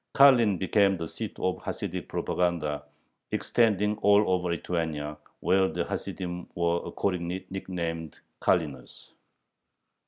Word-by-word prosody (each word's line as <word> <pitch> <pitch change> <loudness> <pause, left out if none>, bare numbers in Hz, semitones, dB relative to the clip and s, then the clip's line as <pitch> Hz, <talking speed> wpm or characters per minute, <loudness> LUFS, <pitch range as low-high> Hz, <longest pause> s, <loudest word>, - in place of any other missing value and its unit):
Karlin 120 -8 +6
became 100 +1 +3
the 85 -1 -4
seat - - -6
of 95 -1 0
a - - -15
Hasidic - - -4
propaganda 75 -5 -1 0.5
extending 105 -3 +2
all 100 +1 +5
over 90 -1 +1
Lithuania, 80 -3 -2 0.2
where 95 0 +3
the 85 0 -2
Hasidim 90 -1 -5
were 85 0 +1
accordingly 90 -1 -2
nicknamed 85 -5 -4 0.2
"Karliners." 65 -4 -1
90 Hz, 115 wpm, -28 LUFS, 85-95 Hz, 0.5 s, Karlin